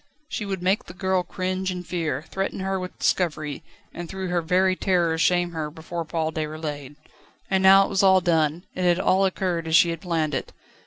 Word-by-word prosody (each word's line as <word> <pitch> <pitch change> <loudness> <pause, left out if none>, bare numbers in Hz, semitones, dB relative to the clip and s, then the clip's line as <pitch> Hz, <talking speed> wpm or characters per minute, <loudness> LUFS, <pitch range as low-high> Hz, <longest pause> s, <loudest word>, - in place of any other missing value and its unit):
She 215 -9 -4
would 190 -2 -4
make 190 +3 +1
the 175 - -11
girl 190 0 +1
cringe 185 +1 -3
and 180 -1 -5
fear, 165 -3 -3
threaten 195 0 -3
her 190 0 -1
with 185 0 -7
discovery, 155 -5 -1 0.3
and 175 -1 -7
through 190 -1 -4
her 175 -1 +1
very 185 +3 +2
terror 175 -4 +1
shame 175 +1 +2
her 160 -2 -4
before 165 +2 -6
Paul 160 0 -2
Déroulède. 150 -3 -5 0.6
And 190 -1 +3
now 195 +1 +7
it - - -6
was 195 0 +1
all 190 -1 +6
done; 165 -2 +1
it - - -5
had 175 0 +3
all 190 +1 +3
occurred 180 -3 -1
as 160 - +2
she 170 0 +6
had 165 -1 -6
planned 160 -4 -1
it. - - -4
175 Hz, 205 wpm, -24 LUFS, 160-190 Hz, 0.6 s, now